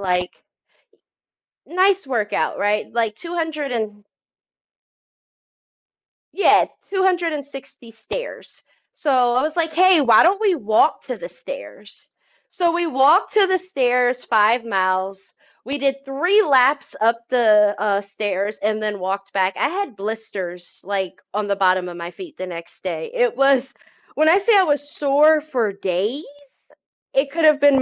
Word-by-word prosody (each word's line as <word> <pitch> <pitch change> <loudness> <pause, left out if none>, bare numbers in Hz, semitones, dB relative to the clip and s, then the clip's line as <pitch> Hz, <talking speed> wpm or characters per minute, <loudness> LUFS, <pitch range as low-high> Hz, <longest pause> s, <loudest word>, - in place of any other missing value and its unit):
like 180 -2 -1 1.3
nice 375 -1 +1
workout, 220 -5 -1
right? 205 +1 -1
Like 225 -3 -1
200 320 -4 -4
an 210 -3 -4 2.3
Yeah, 400 - +4 0.2
260 325 - -3
stairs, 225 - -8 0.3
so 310 -5 -4 0.3
I 255 - +3
was 310 +3 -3
like, 325 -2 -1
"Hey, 370 0 +5
why 235 -5 +6
don't 385 +4 +3
we 405 -4 +3
walk 220 +3 +1
to - - -6
the - - -8
stairs?" - - -11 0.4
So, 350 -3 +1
we 345 0 -1
walked 290 +7 +3
to 415 -2 +5
the 375 0 +2
stairs 250 -8 0
5 225 +2 +3
miles, 190 -1 -2 0.3
we 280 +2 -3
did 275 0 -1
3 350 +10 +2
laps 275 -1 +2
up 230 +1 +3
the, 210 -4 +4
uh, 205 -1 0
stairs 200 0 -4
and 215 +1 -1
then 210 -2 -3
walked 195 +1 -4
back, 190 -1 0
I - - +1
had 365 - -4
blisters, 195 -4 -7
like, 190 -1 -4
on 210 0 -2
the 200 - 0
bottom 185 -1 +1
of 175 - -9
my 170 +1 -7
feet 345 -5 -12
the 185 - -6
next 170 0 -10
day, 165 -3 -4
it 245 -1 +1
was 270 0 +2 0.4
when 310 +1 +3
I 355 - +6
say 425 +2 +3
I 385 - +5
was 290 -3 -1
sore 300 +2 +3
for 245 -9 -2
days; 200 - -3 0.9
it 275 +1 +1
could 325 +2 -2
have 305 -1 +5
been 280 -2 +4
250 Hz, 150 wpm, -20 LUFS, 205-315 Hz, 2.3 s, why